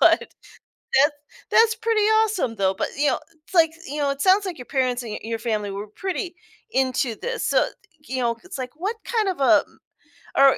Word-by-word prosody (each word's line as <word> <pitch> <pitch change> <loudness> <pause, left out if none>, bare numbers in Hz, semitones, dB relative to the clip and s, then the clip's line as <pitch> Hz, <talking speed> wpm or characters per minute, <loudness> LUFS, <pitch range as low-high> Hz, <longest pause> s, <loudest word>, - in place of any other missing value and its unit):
but - - +6 0.8
that's 295 0 +1 0.3
that's 450 0 +5
pretty 450 -1 +1
awesome, 430 - +2
though, 190 -1 +2
but, 190 - -1
you 290 0 +3
know, - - +1 0.3
it's - - -19
like 330 -2 +6 0.2
you 290 +3 -5
know, 285 -1 +1
it 275 0 -4
sounds 390 +1 +4
like 360 - -4
your 250 - -7
parents 255 -2 0
and 225 -3 -6
y - - -4
your 225 0 -3
family 215 -3 -2
were 200 +2 -5
pretty 365 - -4 0.4
into 260 - +1
this, 480 -1 -2
so, - - +3 0.4
you 260 0 -2
know, 235 -1 +1
it's 370 - -8
like, 255 -1 -4
what 400 +7 -2
kind 440 -4 0
of 370 - -2
a 270 - +6 0.8
or 275 -1 +7
280 Hz, 205 wpm, -23 LUFS, 240-390 Hz, 0.8 s, or